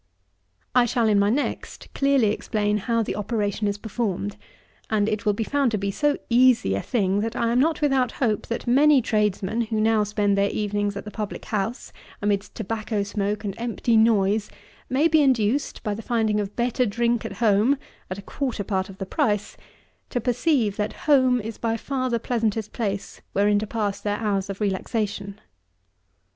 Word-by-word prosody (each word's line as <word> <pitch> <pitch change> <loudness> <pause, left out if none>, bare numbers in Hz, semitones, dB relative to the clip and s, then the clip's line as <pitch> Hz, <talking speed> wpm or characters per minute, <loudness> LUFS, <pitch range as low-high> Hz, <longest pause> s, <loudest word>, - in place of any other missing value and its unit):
I 250 -1 +5
shall, 235 0 +1
in 210 -2 +4
my 200 0 +3
next, 275 +6 -3
clearly 275 -6 +3
explain 210 -1 -1
how 230 +2 0
the 195 - -3
operation 210 -1 -1
is 200 0 -1
performed; 200 - -3 0.5
and 210 -1 +2
it 215 0 -2
will 210 - +4
be 225 - -2
found 280 +2 +1
to - - +2
be 200 0 -2
so 295 +7 +1
easy 240 - +4
a 100 - -1
thing, 195 - 0
that 225 +3 -2
I 230 -1 +1
am 240 - +3
not 315 +4 +2
without 265 -4 +2
hope, 220 -6 -1
that 235 - -3
many 280 +4 +5
tradesmen, 210 0 0
who 220 -1 -2
now 220 0 +3
spend 205 -1 +1
their 200 0 +2
evenings 205 -1 -1
at - - -7
the 210 - -7
public 210 -2 -5
house, 215 +3 -3 0.3
amidst 205 -1 -1
tobacco 215 -1 -2
smoke 205 0 -2
and 200 -2 -3
empty 235 0 0
noise, 215 -2 +3 0.4
may 275 +5 +3
be 315 -1 +4
induced, 260 0 +1
by 210 - -1
the 215 - -6
finding 220 -2 +1
of 205 0 -4
better 245 +1 +1
drink 235 +2 0
at - - -5
home, 225 +4 +3 0.3
at 185 - -4
a 200 - -9
quarter 250 -3 -3
part 190 -2 -2
of 195 - -11
the 195 - -4
price, 205 +2 -1 0.5
to 245 - -1
perceive 245 - +1
that 210 0 -1
home 260 -4 +4
is 225 0 -6
by 230 -1 0
far 255 +2 -2
the 235 -1 0
pleasantest 225 -3 -1
place 200 -4 -3
wherein 205 +1 +3
to 215 - -4
pass 205 -3 -2
their 205 0 -1
hours 200 -3 -1
of 195 - -5
relaxation. 205 0 -2
215 Hz, 185 wpm, -24 LUFS, 205-240 Hz, 0.5 s, I